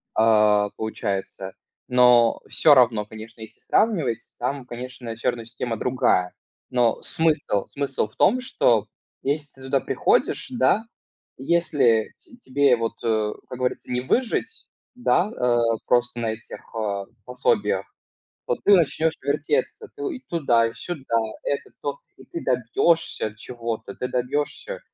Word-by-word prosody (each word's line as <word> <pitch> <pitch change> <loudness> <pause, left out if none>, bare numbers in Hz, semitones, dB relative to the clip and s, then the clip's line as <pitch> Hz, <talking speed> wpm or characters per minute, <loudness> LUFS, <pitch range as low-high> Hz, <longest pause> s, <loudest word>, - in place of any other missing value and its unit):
а, 105 -2 +4
получается. 100 -3 -4 0.4
Но 125 -2 +5
всё 150 - +5
равно, 115 -5 +4
конечно, 110 +1 -11
если 110 0 -11
сравнивать, 150 - 0
там, 135 +1 -2
конечно, 125 -1 -7
всё 115 - 0
равно 115 -1 -4
система 115 0 -4
другая. 125 -8 +1 0.4
Но 120 -2 +2
смысл 150 -11 0
смысл 140 -5 -2
в 110 - -25
том, 255 +6 +3
что 115 - +2 0.4
если 145 +1 -2
ты 135 - -17
туда 130 +1 +1
приходишь, - - +1
да, 190 +12 +2 0.5
если 135 -7 +2
те 245 - -18
тебе 140 - +3
вот, 115 0 -2
э, 110 -2 +1 0.2
как 125 - -6
говорится, 125 0 -2
не 125 0 0
выжить, 250 - -1 0.3
да, 210 -5 +2
э, 125 - +1 0.3
просто 120 0 +1
на 115 -1 0
этих, 110 0 -10 0.2
э, 100 -3 -2 0.2
пособиях, 110 -6 0 0.6
то 125 - 0
ты 205 - +6
начнёшь 160 -1 +2
вертеться, 440 - -1
ты 425 - -8
и 255 - -14
туда, 120 -9 +2
и 115 - -4
сюда, 135 -1 -3 0.3
это, 140 - -2
то. 140 -1 -3 0.2
И - - -15
ты 170 - -6
добьешься 125 0 +1
чего-то, 115 -3 -5
ты 125 - -4
добьешься. 145 - -2
125 Hz, 140 wpm, -24 LUFS, 115-145 Hz, 0.6 s, ты